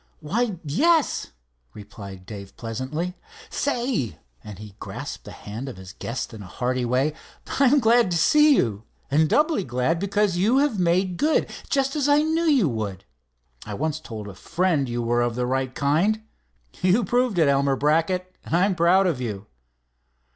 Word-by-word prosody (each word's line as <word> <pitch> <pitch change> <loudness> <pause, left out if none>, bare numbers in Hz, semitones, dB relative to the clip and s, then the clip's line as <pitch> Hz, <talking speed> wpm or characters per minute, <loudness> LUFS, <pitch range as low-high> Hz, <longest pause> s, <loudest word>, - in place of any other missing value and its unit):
"Why, 210 +6 -1
yes," 310 - +2 0.5
replied 100 -2 -10
Dave 100 -1 -9
pleasantly. 130 +10 -4 0.4
"Say," 240 - -1 0.3
and 105 -3 -9
he 105 0 -10
grasped - - -7
the - - -9
hand 115 +6 -7
of 120 - -9
his 95 +1 -10
guest 120 0 -5
in 110 - -9
a 95 - -9
hearty 125 +5 -2
way, 130 +5 +1 0.5
"I 280 - +6
am 280 +3 +5
glad 235 -3 +4
to 170 - 0
see 300 - +5
you, 105 - 0 0.3
and 155 +2 +3
doubly 305 - +2
glad 125 +6 0
because 200 -1 +1
you 215 +8 +3
have 275 -7 +2
made 180 +1 +1
good, 310 +2 +1 0.2
just 275 0 +1
as 290 -1 +1
I 290 +1 +5
knew 320 +2 0
you 275 - +4
would. 105 -6 -4 0.6
I - - -6
once 155 +1 -2
told 110 -8 -8
a 100 - -8
friend 165 - 0
you 120 0 -2
were 120 +1 +1
of 120 -1 0
the 125 0 -1
right 130 0 -1
kind. 175 +10 +1 0.6
You've 190 +5 +3
proved 245 -1 +1
it, 160 -3 +4
Elmer 140 0 +2
Brackett, 165 +6 0
and - - -2
I'm 190 +3 +3
proud 180 +3 +4
of 160 -8 0
you." 105 -4 -4
160 Hz, 175 wpm, -24 LUFS, -, 0.6 s, I